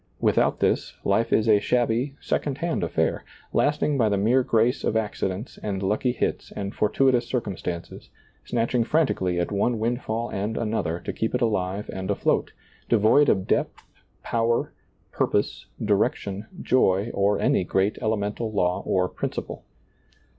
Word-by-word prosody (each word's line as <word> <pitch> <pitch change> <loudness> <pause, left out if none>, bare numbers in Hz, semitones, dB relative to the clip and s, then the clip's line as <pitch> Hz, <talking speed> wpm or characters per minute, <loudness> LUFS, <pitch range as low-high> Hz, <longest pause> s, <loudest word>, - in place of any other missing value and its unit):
Without - - +2
this, - - +1
life 105 +4 +2
is 110 - +3
a 105 -2 +6
shabby, 120 +4 0
second 140 -3 -2
hand 165 - -1
affair, 85 - 0 0.3
lasting 145 -1 +1
by 110 -3 +3
the 100 - +1
mere 115 +7 +3
grace 120 +2 +1
of - - 0
accidents 105 0 -3
and 100 -2 -3
lucky 105 +6 +1
hits 120 - -2
and 100 0 -4
fortuitous 125 +2 +2
circumstances, 90 -8 -4 0.3
snatching 120 0 0
frantically 115 - +1
at 85 - -1
one 105 +4 +1
windfall 115 0 -2
and 105 +3 -2
another 105 -7 -1
to - - -5
keep 110 +2 -1
it 125 - -1
alive 100 -2 -1
and 95 0 -5
afloat, - - +1 0.4
devoid 115 +6 +5
of 95 -1 +2
depth, - - -1 0.4
power, 115 0 0 0.4
purpose, - - -1 0.2
direction, 100 0 0
joy, 105 -3 +2
or 100 +1 +2
any - - +2
great 95 +3 0
elemental 110 +1 -1
law 90 -3 +1
or 90 -1 +2
principle. - - -5
110 Hz, 145 wpm, -25 LUFS, 100-120 Hz, 0.4 s, a